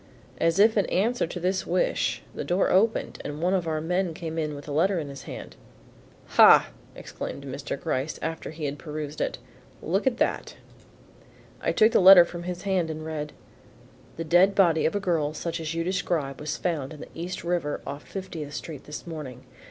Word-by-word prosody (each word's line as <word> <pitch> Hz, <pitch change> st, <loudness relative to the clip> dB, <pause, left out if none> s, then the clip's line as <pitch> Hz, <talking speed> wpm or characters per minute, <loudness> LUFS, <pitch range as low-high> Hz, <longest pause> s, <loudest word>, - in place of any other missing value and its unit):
As 165 Hz, +1 st, +2 dB
if 220 Hz, +2 st, +5 dB
in 205 Hz, -, +2 dB
answer 225 Hz, +2 st, +1 dB
to 175 Hz, -, -6 dB
this 185 Hz, +2 st, -1 dB
wish -, -, 0 dB
the -, -, -4 dB
door 180 Hz, +2 st, +1 dB
opened 215 Hz, +5 st, +1 dB
and 145 Hz, +1 st, -5 dB
one 180 Hz, +3 st, +1 dB
of 180 Hz, -3 st, 0 dB
our 155 Hz, -1 st, -1 dB
men 175 Hz, +1 st, -1 dB
came 165 Hz, -1 st, -4 dB
in 150 Hz, -2 st, -2 dB
with 145 Hz, +1 st, -10 dB
a -, -, -5 dB
letter 175 Hz, +6 st, +2 dB
in 150 Hz, -4 st, -3 dB
his 140 Hz, 0 st, -9 dB
hand. -, -, -8 dB, 0.7 s
"Ha!" -, -, +7 dB, 0.3 s
exclaimed -, -, -7 dB
Mr. -, -, -5 dB
Gryce, 135 Hz, +4 st, -2 dB
after 165 Hz, 0 st, -4 dB
he 155 Hz, -1 st, -6 dB
had 145 Hz, 0 st, -4 dB
perused 150 Hz, -1 st, -6 dB
it, -, -, -1 dB, 0.4 s
"look 195 Hz, +9 st, -1 dB
at 245 Hz, -2 st, +2 dB
that." -, -, -1 dB, 1.1 s
I -, -, +1 dB
took 220 Hz, +1 st, +4 dB
the -, -, +4 dB
letter 185 Hz, -1 st, +10 dB
from 170 Hz, 0 st, -7 dB
his 180 Hz, -1 st, -5 dB
hand 190 Hz, -4 st, 0 dB
and 155 Hz, 0 st, -5 dB
read: 150 Hz, -2 st, -4 dB, 0.9 s
The 165 Hz, -, -3 dB
dead 175 Hz, +5 st, +4 dB
body 170 Hz, -6 st, +4 dB
of 160 Hz, -, -3 dB
a -, -, +1 dB
girl 160 Hz, -6 st, 0 dB
such 170 Hz, +1 st, -3 dB
as 160 Hz, 0 st, -4 dB
you 165 Hz, -, 0 dB
describe 165 Hz, -6 st, -1 dB
was 150 Hz, 0 st, -3 dB
found 155 Hz, -5 st, -2 dB
in 150 Hz, -, -11 dB
the -, -, -9 dB
East 175 Hz, +3 st, -5 dB
river 170 Hz, -4 st, -1 dB
off 140 Hz, +1 st, -6 dB
Fiftieth 165 Hz, -7 st, -7 dB
Street 150 Hz, -3 st, -7 dB
this 150 Hz, -, -8 dB
morning. 150 Hz, -7 st, -7 dB
165 Hz, 200 wpm, -26 LUFS, 150-185 Hz, 1.1 s, letter